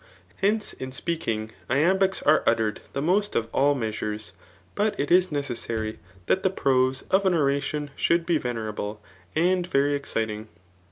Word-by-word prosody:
Hence, 210 +3 +1
in 130 0 -7
speaking, 125 -7 -3 0.2
iam 160 +9 +3
Imcs 190 0 +1
are 155 +1 +5
uttered 110 -2 +1
the 140 - -2
most 200 +5 +1
of 115 - +1
all 145 +2 +3
measures. 110 -3 -3 0.4
But 210 +1 0
it 145 - -1
is, 180 0 +5
necessary 115 -6 -3 0.3
that 190 - +2
the 190 - +2
prose 130 -6 +1
of 190 +1 +4
an 180 - +3
oradon 145 0 0
should 170 0 +2
be 170 -2 +2
natt" 120 -1 -3
rable 105 0 -4 0.4
and 180 +2 +2
very 145 -3 +2
exddng. 110 -5 -3
140 Hz, 160 wpm, -26 LUFS, 115-175 Hz, 0.4 s, are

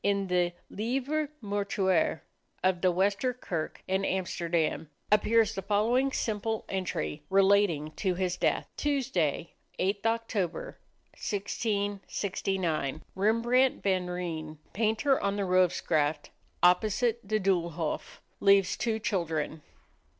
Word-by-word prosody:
In 200 -1 +1
the 180 -1 +2
"Livre 270 +7 -1
Mortuaire" 200 -5 +1 0.4
of 185 -1 +2
the 185 - +4
Wester 200 +7 +1
Kerk 170 -10 -4
in 190 +1 0
Amsterdam 170 -5 -1 0.2
appears 220 +1 +4
the 195 - -4
following 225 +7 +2
simple 220 -2 -2
entry, 170 - -3
relating 195 -6 +3
to 185 -3 0
his 180 -1 -1
death: - - 0
"Tuesday, 210 - 0 0.2
8th 200 +2 0
Oct., 230 +2 -1
1669, 195 - -3
Rembrandt 230 +6 +2
van 185 -2 +1
Rijn, 165 -3 -4 0.2
Painter 225 +6 +2
on 200 0 0
the 205 - -1
Rovzegraft, 160 -5 +1 0.3
opposite 215 +6 +3
the 215 +2 0
Doolhof. 170 -5 -1 0.2
Leaves 195 -2 +4
two 225 -2 -1
children." 165 -7 -2
195 Hz, 105 wpm, -29 LUFS, 175-215 Hz, 0.4 s, the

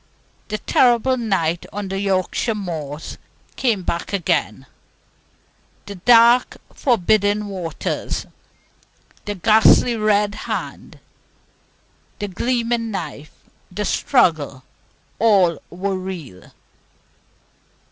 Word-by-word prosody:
The 215 - -3
terrible 245 +3 +3
night 190 -8 -1
on 205 -1 -5
the 195 0 -3
Yorkshire 195 +3 0
moors 160 -7 -6 0.4
came 225 -8 0
back 170 +3 -3
again, 135 - -1 1.2
the 200 - -7
dark 235 +5 +4 0.2
forbidding 210 -3 +1
waters, 185 -5 -4 1.0
the 205 - -3
ghastly 220 +4 +4
red 210 -1 +1 0.2
hand, - - -5 1.2
the 205 - -4
gleaming 235 +3 -1
knife, 155 -7 -6 0.4
the 210 +3 -3
struggle 155 - +1 0.6
all 195 -7 +3
were 190 +2 -3
real. 180 - -8
200 Hz, 85 wpm, -20 LUFS, 175-225 Hz, 1.2 s, dark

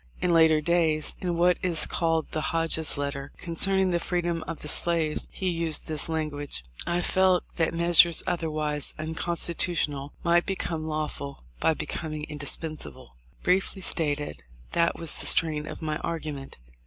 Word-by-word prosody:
In 175 - +1
later 160 -2 +5
days, 160 -2 +2
in 175 -2 -2
what 175 +1 +3
is 170 -4 +3
called 165 -2 -1
the 155 - -2
Hodges 165 -1 0
letter, 140 0 -4
concerning 190 +2 +2
the 170 - +1
freedom 175 -1 -2
of 165 - -6
the - - -5
slaves, 160 -1 -1
he 190 - -4
used 165 -3 +2
this 155 0 -2
language: 145 - -3 0.2
"I 175 +1 +1
felt 185 0 +3
that 165 -2 +1
measures 170 0 +5
otherwise 155 -4 -1
unconstitutional 160 -2 -1
might 170 0 +3
become 165 -4 -3
lawful 150 - -4 0.2
by 160 - +2
becoming 155 -1 -5
indispensable." 150 - -7 0.3
Briefly 190 +1 +1
stated, 145 - +1 0.3
that 170 0 +2
was 165 -2 -4
the - - +1
strain 155 -2 +3
of - - -8
my 155 -1 -1
argument. 155 -5 -5
160 Hz, 145 wpm, -26 LUFS, 150-170 Hz, 0.3 s, later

